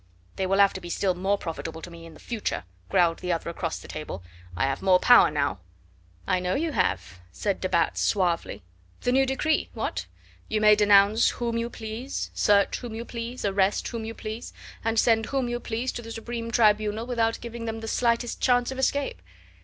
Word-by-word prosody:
"They 190 Hz, -, -1 dB
will 195 Hz, +1 st, +2 dB
have 200 Hz, -1 st, +5 dB
to -, -, -6 dB
be 175 Hz, -, -8 dB
still 185 Hz, +2 st, +1 dB
more 190 Hz, +3 st, 0 dB
profitable 165 Hz, -2 st, -6 dB
to 175 Hz, -, -8 dB
me 165 Hz, 0 st, -11 dB
in 160 Hz, -, -13 dB
the -, -, -15 dB
future," 230 Hz, -, -3 dB, 0.3 s
growled 170 Hz, -2 st, +3 dB
the 180 Hz, -, -2 dB
other 170 Hz, 0 st, -2 dB
across 165 Hz, -1 st, -3 dB
the -, -, -11 dB
table. 150 Hz, -, -6 dB, 0.3 s
"I -, -, +1 dB
have 135 Hz, 0 st, -1 dB
more 190 Hz, -1 st, +5 dB
power 245 Hz, +6 st, +7 dB
now." 140 Hz, -10 st, -1 dB, 0.7 s
"I 185 Hz, -, +1 dB
know 180 Hz, 0 st, -1 dB
you 325 Hz, +2 st, -1 dB
have," 90 Hz, -, -1 dB
said 200 Hz, -, -2 dB
de 185 Hz, -, -1 dB
Batz 170 Hz, -2 st, +1 dB
suavely. 170 Hz, -, 0 dB, 0.4 s
"The 245 Hz, -, +1 dB
new 265 Hz, +1 st, +3 dB
decree? 305 Hz, +4 st, 0 dB
What? -, -, -3 dB, 0.4 s
You 215 Hz, -, 0 dB
may 210 Hz, 0 st, +7 dB
denounce 205 Hz, +1 st, +5 dB
whom 235 Hz, -1 st, -3 dB
you 230 Hz, 0 st, -1 dB
please, 230 Hz, +4 st, -5 dB
search 200 Hz, -1 st, +3 dB
whom 240 Hz, -3 st, -7 dB
you 230 Hz, +1 st, -5 dB
please, 235 Hz, +1 st, -5 dB
arrest 195 Hz, 0 st, +1 dB
whom 230 Hz, -2 st, -5 dB
you 225 Hz, +1 st, -6 dB
please, 220 Hz, +2 st, -7 dB, 0.3 s
and 225 Hz, 0 st, 0 dB
send 225 Hz, -1 st, +3 dB
whom 270 Hz, -2 st, -1 dB
you 240 Hz, 0 st, -2 dB
please 235 Hz, +2 st, -3 dB
to -, -, -6 dB
the 230 Hz, -1 st, -9 dB
Supreme 230 Hz, 0 st, -5 dB
Tribunal 215 Hz, -1 st, +2 dB
without 230 Hz, -2 st, 0 dB
giving 235 Hz, 0 st, -7 dB
them 225 Hz, 0 st, -4 dB
the 225 Hz, -, -6 dB
slightest 235 Hz, +1 st, 0 dB
chance 245 Hz, -1 st, +3 dB
of 265 Hz, -, -6 dB
escape." 275 Hz, -, 0 dB
220 Hz, 205 wpm, -26 LUFS, 185-235 Hz, 0.7 s, power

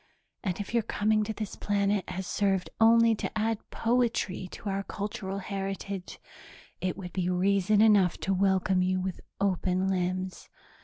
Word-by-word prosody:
And 185 Hz, -2 st, -2 dB
if 205 Hz, +2 st, -5 dB
your 235 Hz, -, +3 dB
coming 215 Hz, 0 st, +1 dB
to 220 Hz, -, -3 dB
this 215 Hz, -1 st, -5 dB
planet 200 Hz, -1 st, 0 dB
has 185 Hz, +1 st, -4 dB
served 195 Hz, -1 st, 0 dB
only 230 Hz, 0 st, +6 dB
to 220 Hz, -, -4 dB
add 220 Hz, 0 st, 0 dB
poetry 230 Hz, -6 st, 0 dB
to 210 Hz, -, -9 dB
our 195 Hz, 0 st, 0 dB
cultural 195 Hz, -1 st, -4 dB
heritage, 195 Hz, -1 st, -5 dB, 0.6 s
it 185 Hz, -1 st, -2 dB
would 180 Hz, -3 st, -7 dB
be 180 Hz, -1 st, 0 dB
reason 200 Hz, +3 st, +3 dB
enough 205 Hz, -5 st, +5 dB
to 195 Hz, -, 0 dB
welcome 190 Hz, -1 st, +2 dB
you 185 Hz, 0 st, +1 dB
with 185 Hz, -1 st, -4 dB, 0.2 s
open 185 Hz, -1 st, +1 dB
limbs. 185 Hz, 0 st, -2 dB
195 Hz, 155 wpm, -29 LUFS, 185-210 Hz, 0.6 s, only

